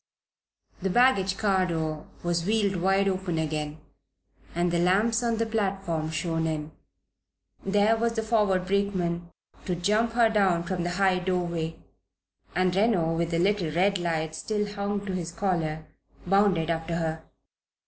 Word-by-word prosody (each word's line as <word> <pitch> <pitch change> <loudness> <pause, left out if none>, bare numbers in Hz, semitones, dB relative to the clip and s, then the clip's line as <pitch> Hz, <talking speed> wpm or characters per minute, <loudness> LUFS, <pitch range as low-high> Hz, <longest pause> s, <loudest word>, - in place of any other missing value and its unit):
The 190 - 0
baggage 195 -4 +3
car 190 -3 +2
door 160 -2 -3 0.2
was 170 -1 0
wheeled 205 -1 +1
wide 195 +2 +2
open 185 -3 -1
again 155 -1 -2 0.8
and 175 0 +1
the 170 - +1
lamps 210 +7 +2
on 235 -2 0
the 230 - +1
platform 195 -7 -1
shone 165 0 -1
in. 155 -1 -3 0.9
There 205 +3 +3
was 230 +1 0
the 225 -1 -2
forward 210 -5 +2
brakeman 185 -3 -1 0.4
to 180 - -1
"jump" 210 +6 +1
her 235 -1 +5
down 195 -6 +2
from 185 0 -3
the 175 - -1
high 190 -2 +3
doorway, 175 -3 -2 0.8
and 185 0 +2
Reno, 190 -6 +2
with 170 0 0
the 170 - 0
little 190 -1 +1
red 185 +5 +2
light 160 -2 -1
still 210 +4 -2
hung 200 0 -2
to 195 - -3
his 170 -2 -3
collar, 165 -5 -2 0.4
bounded 185 -4 +3
after 165 0 -2
her. 160 -1 -2
185 Hz, 150 wpm, -27 LUFS, 165-205 Hz, 0.9 s, her